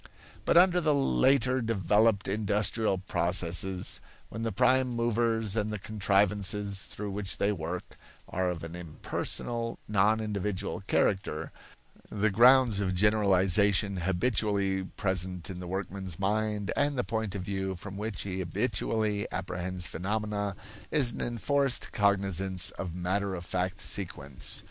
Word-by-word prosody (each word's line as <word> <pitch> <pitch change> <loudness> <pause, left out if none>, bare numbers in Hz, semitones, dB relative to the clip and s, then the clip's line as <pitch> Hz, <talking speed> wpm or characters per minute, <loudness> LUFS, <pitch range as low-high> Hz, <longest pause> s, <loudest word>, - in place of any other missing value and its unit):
But - - +4
under 180 0 +6
the 155 -3 +2
later 130 -2 +3
developed 105 -1 +2
industrial 105 0 0
processes, 90 0 0 0.3
when 115 - -6
the 115 0 -1
prime 130 +4 +3
movers 115 -3 0
and 105 -1 0
the 105 - -2
contrivances 100 -1 +1
through 105 0 -5
which 100 -1 -3
they 100 - +1
work 90 -1 -5 0.3
are 90 0 -1
of 85 -2 -4
an 85 +1 -7
impersonal, 115 +7 -4
non 105 +1 +3
individual 100 -3 -3
character, 80 -5 0 0.6
the 105 0 0
grounds 120 0 +6
of 95 -2 0
generalization 100 0 +3
habitually 95 +1 0
present 95 -1 -2
in 90 - -7
the 90 - -7
workman's 95 -1 -4
mind 105 +1 -1
and 145 -1 +1
the 125 - +1
point 110 -3 -3
of 95 - -3
view 95 0 -3
from 95 +2 -8
which 105 +1 -3
he 95 -1 -4
habitually 105 +2 -1
apprehends 90 0 -3
phenomena 105 +2 -2 0.3
is 140 -6 +3
an - - -6
enforced 135 +3 0
cognizance 95 -2 +2
of 90 -3 -6
matter 95 +2 -1
of 90 -1 -7
fact 95 +2 -2
sequence. 75 -10 -1
100 Hz, 135 wpm, -29 LUFS, 95-110 Hz, 0.6 s, under